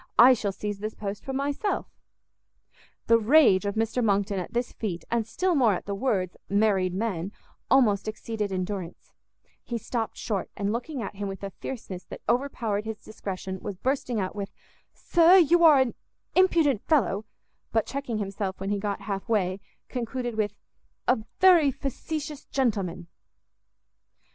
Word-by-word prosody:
I 255 +2 +9
shall 215 -5 -1
seize 205 +1 -4
this 215 +1 -4
post 200 -1 -5
for 270 - -5
myself." 280 +9 -1 1.2
The 230 0 +5
rage 225 -5 +5
of 200 - -2
Mr 225 +2 0
Monckton 200 -2 +1
at 180 - -6
this 240 +1 -1
feat, 185 -6 -4
and 230 -2 +1
still 360 +11 0
more 245 -9 +4
at - - -6
the 200 - -3
words 195 -5 0
married 200 -3 +2
men, 195 -3 -2 0.4
almost 220 -7 +4
exceeded 215 -1 -3
endurance; 185 -1 -4 0.5
he 235 - -4
stopt 230 0 -3
short, 205 -4 -2
and 200 +1 0
looking 250 +2 -3
at 200 - -7
him 205 0 -3
with 195 0 -7
a 195 - -4
fierceness 190 -6 -7
that - - -9
overpowered 235 -5 0
his 220 -1 -6
discretion, 190 -3 -6
was 200 - -5
bursting 255 -1 -1
out 185 0 -3
with, 200 -1 -4 0.4
"Sir, 345 +2 +5
you 345 0 +5
are 310 -4 +8
an 260 -2 +2 0.4
impudent 330 - +4
fellow," 215 - +2 0.5
but 225 -1 +2
checking 270 -5 -3
himself 195 -1 -3
when 195 +1 -3
he 205 - 0
got 200 0 -3
half 200 +2 -4
way, 190 -4 +1 0.3
concluded 245 0 -3
with, 210 -1 -1 0.5
"a 250 - +4 0.2
very 350 -6 +7
facetious 290 +2 -5
gentleman!" 200 -10 -1
220 Hz, 160 wpm, -27 LUFS, 200-260 Hz, 1.2 s, I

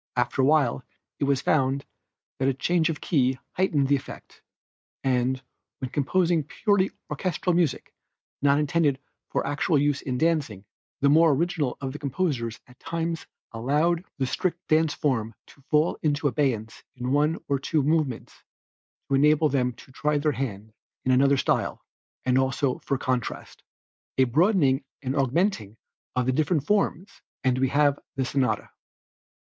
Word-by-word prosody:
After 125 +2 +1
a - - +4
while 140 -4 +2 0.4
it - - +1
was 140 -1 +1
found 135 -2 +1 0.5
that 135 - +1
a 135 - +1
change 170 +3 +1
of 155 - -4
key 130 -5 +1
heightened 155 -7 +1
the 140 - +4
effect, 135 - -9 0.6
and, 130 0 +1 0.3
when 130 -2 -5
composing 165 +3 +1
purely 195 +5 +1 0.2
orchestral 180 0 -1
music 170 -5 0 0.5
not 140 0 +4
intended 150 -1 +2 0.3
for - - -1
actual 145 +3 +1
use 145 0 +1
in 125 -2 -3
dancing, 140 - 0 0.4
the 140 - +4
more 160 +2 +6
original 160 -3 -1
of 135 -1 -4
the 150 - -7
composers 135 -5 -2
at 125 -1 -20
times 165 0 -3 0.2
allowed 150 +9 +1
the 135 - 0
strict 170 +6 -2
dance 155 -1 +2
form 115 -6 -1
to 140 - -19
fall 155 +2 +2
into 145 -1 +1
abeyance 125 -6 -1
in 125 0 -3
one 150 +3 +2
or 140 -1 +1
two 145 +2 0
movements 150 -5 -1 0.6
to - - -2
enable 150 +2 +4
them 125 -3 +1
to 125 - -16
try 150 +3 0
their 150 +1 +1
hand 110 -5 -5 0.3
in 130 - +3
another 135 +2 +4
style, - - -1 0.4
and 130 0 +3
also 130 0 0
for 135 - -2
contrast. 130 -2 -3 0.6
A 130 - +6
broadening 145 - +3 0.2
and 130 +1 -2
augmenting 135 - 0 0.4
of 125 -1 +1
the 130 - +2
different 150 +2 +1
forms 200 -1 -1 0.2
and 130 -1 +2
we 130 - +3
have 145 0 +3 0.2
the 135 -1 0
sonata. 130 -1 -1
140 Hz, 155 wpm, -26 LUFS, 130-155 Hz, 0.6 s, more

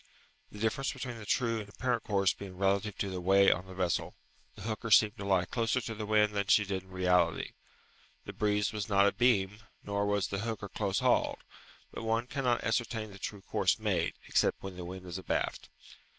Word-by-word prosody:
The - - -11
difference 115 +5 -1
between 125 -3 -6
the 105 - -10
true 115 -3 +1
and 105 -1 -8
apparent 120 +2 -1
course 100 -3 +2
being 95 -2 -9
relative 100 +2 +1
to 100 - -2
the 90 -1 -4
way 95 +2 +5
on 90 +2 -2
the 95 - -10
vessel, 90 -3 -1 0.4
the - - -10
hooker 110 +1 -3
seemed 110 0 +6
to 100 - -6
lie 95 -2 +2
closer 115 +5 0
to 115 -2 -5
the 105 -1 -5
wind 105 -1 +3
than 100 -1 -1
she 105 - +5
did 95 -1 -2
in 95 - -21
reality. 90 -2 +1 0.7
The - - -7
breeze 105 0 0
was 105 0 -3
not 100 -1 +5
a 100 - +4
beam, 105 -5 +2 0.2
nor 100 0 -1
was 100 -2 0
the 100 - -2
hooker 110 -2 -4
close 100 -3 -1
hauled; - - +2 0.5
but - - -6
one 115 +1 0
cannot 125 -2 0
ascertain 115 -3 -1
the 100 - -12
true 100 0 -6
course - - +1
made, - - 0
except - - +1
when 95 -1 -6
the 90 -1 -7
wind 95 +1 -8
is 90 +1 -5
abaft. 95 - -2
100 Hz, 210 wpm, -31 LUFS, 95-110 Hz, 0.7 s, seemed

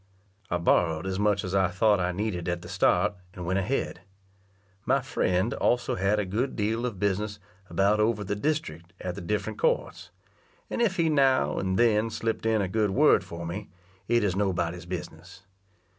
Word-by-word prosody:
I 85 - +1
borrowed 85 -1 +2
as 95 0 -2
much 105 -1 +2
as 95 - -4
I 95 -1 +3
thought 100 +3 +2
I 90 0 0
needed 90 -2 -3
at 85 0 -3
the - - -9
start, 95 +1 +2 0.2
and 90 -2 -6
went 95 +2 +1
ahead. 110 +9 -2 0.8
My 135 +4 +2
friend 110 -5 0
also 120 0 +1
had 95 +3 +1
a 105 - 0
good 115 +8 -2
deal 115 +3 0
of 110 -6 -6
business 105 +2 -1 0.3
about 100 +2 +2
over 105 -1 +1
the 100 +1 -2
district 95 - -3
at 90 - -4
the 100 - -7
different 105 - -3
courts; - - 0 0.6
and - - -1
if 215 -5 +2
he 170 -2 +2
now 135 -4 +3
and 95 0 -1
then 115 -2 +3
slip'd 115 0 -2
in 110 -2 +2
a - - -1
good 105 +2 +1
word 95 - +4
for 85 0 -7
me, 95 +5 -5 0.4
it 120 -2 +3
is 95 -3 +1
nobody's 90 -3 -1
business. 90 +1 -8
100 Hz, 185 wpm, -27 LUFS, 90-115 Hz, 0.8 s, word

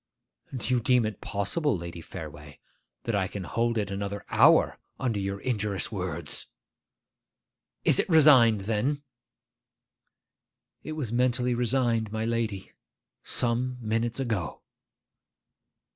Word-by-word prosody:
'Do 125 +1 -2
you 125 - +3
deem 125 0 +3
it 110 -2 -5
possible, 120 - -1
Lady 85 0 -7
Fareway, 75 -3 -9 0.5
that 115 - -2
I 100 -2 +1
can 100 0 -6
hold 115 +4 0
it 100 -2 -1
another 100 0 -4
hour, - - +5 0.2
under 115 -5 -1
your 100 0 -3
injurious 105 -6 -2
words?' 90 -6 -5 1.4
'Is - - +4
it - - 0
resigned, 135 - +6
then?' 115 +8 -1 1.8
'It 155 - -6
was 140 -8 -4
mentally 125 0 +2
resigned, 120 -2 +1
my 110 0 -2
lady, 115 -4 -2 0.5
some 125 +1 -1
minutes 115 +2 -1
ago. 110 - -3
115 Hz, 115 wpm, -27 LUFS, 100-125 Hz, 1.8 s, resigned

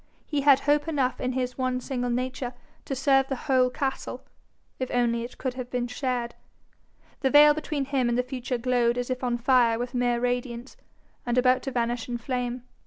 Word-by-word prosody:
He 295 -2 -1
had 275 -1 +6
hope 295 +2 +2
enough 275 -5 0
in 255 0 -1
his 255 0 -3
one 255 -1 0
single 245 -1 -3
nature 250 0 -3 0.3
to 270 - -3
serve 270 0 +3
the 270 - -2
whole 260 -3 +3
castle, 265 +1 -4 0.6
if 255 - -2
only 235 -1 +1
it 240 - -9
could 260 -2 -3
have 250 -1 -6
been 250 -1 -1
shared. 245 -1 -2 0.9
The 270 - +1
veil 295 +1 +8
between 300 -2 -3
him 265 -3 0
and 240 - +1
the 250 - +2
future 250 0 -3
glowed 240 0 +1
as 245 +1 -2
if 255 0 -3
on 240 -1 0
fire 240 -2 +3
with 245 +2 -4
mere 245 -1 +1
radiance, 245 0 -3 0.5
and 240 0 -1
about 255 0 +4
to 270 - -4
vanish 240 -1 -2
in 240 - -2
flame. 245 0 -3
250 Hz, 195 wpm, -26 LUFS, 245-265 Hz, 0.9 s, veil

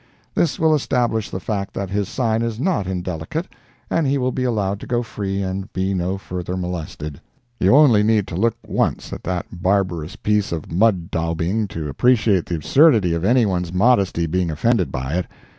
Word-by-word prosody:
This 165 - +1
will 160 -1 +3
establish 120 -6 0
the 95 - -4
fact 100 +1 -4
that 95 -1 -4
his 100 -1 -1
sign 115 -3 0
is 115 -1 -2
not 150 - 0
indelicate, 90 - -3 0.4
and 165 -4 +1
he 140 +1 +2
will 130 -1 0
be 130 - -2
allowed 100 -5 0
to - - -9
go 120 -1 0
free 100 -3 -3
and 95 0 -4
be 95 +1 -1
no 95 +1 -1
further 90 -1 -5
molested. 80 -5 -5 0.4
You - - +5
only 135 -8 +6
need 105 -1 +2
to 80 - -5
look 115 +5 +1
once - - -1
at - - -6
that 90 -2 -2 0.2
barbarous 90 -3 0
piece 105 -1 0
of 80 -2 -5
mud 95 -1 +2
daubing 85 +6 -1
to 80 -5 -5
appreciate 105 - +2
the 85 - -2
absurdity 110 - +4
of 85 0 -2
any 120 +4 +4
one's 90 -4 -1
modesty 95 -4 +2
being 90 +2 0
offended 90 +5 +1
by 65 +6 -2
it. 90 - -4
95 Hz, 190 wpm, -21 LUFS, 90-115 Hz, 0.4 s, only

